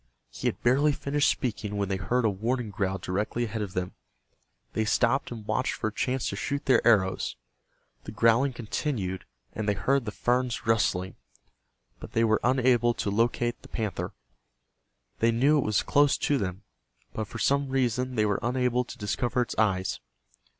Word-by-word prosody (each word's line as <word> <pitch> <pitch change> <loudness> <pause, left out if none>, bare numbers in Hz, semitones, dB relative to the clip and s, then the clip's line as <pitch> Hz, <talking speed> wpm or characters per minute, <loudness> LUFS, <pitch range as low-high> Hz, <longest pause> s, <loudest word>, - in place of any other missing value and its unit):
He - - -3
had - - -1
barely 140 +5 +4
finished 140 +1 +1
speaking 105 -4 -2
when 100 -1 0
they 95 0 -1
heard 115 +6 0
a - - +4
warning 115 +3 -2
growl 95 -1 -1
directly 100 +6 -2
ahead 110 -1 -3
of 100 -3 -4
them. 90 0 -3 0.8
They 110 - +1
stopped 120 +4 +2
and 115 -3 -8
watched 110 0 0
for 110 - -2
a - - -14
chance 130 +2 -1
to - - -4
shoot 140 0 -3
their 130 - +4
arrows. 95 -5 +2 0.7
The - - -6
growling 115 +5 +3
continued, 110 -5 -3 0.3
and 110 -1 -2
they 105 - +2
heard 135 +5 +1
the 105 - -3
ferns 125 +2 0
rustling, 95 -4 +1 0.8
but - - -10
they 115 - +3
were 110 -1 +3
unable 125 -2 +3
to 100 - -2
locate 120 +2 0
the - - -13
panther. 95 -6 -3 1.1
They 115 +1 +3
knew 140 +6 +3
it - - +1
was 105 -2 +1
close 145 -1 +3
to 145 -2 +1
them, 95 -1 -4 0.5
but 110 -1 -3
for - - -8
some 140 0 +1
reason 125 -1 0
they 105 -2 +2
were 100 -2 +1
unable 125 0 +1
to 125 - -10
discover 120 +3 0
its - - -6
eyes. 95 -4 +1
115 Hz, 180 wpm, -27 LUFS, 105-125 Hz, 1.1 s, barely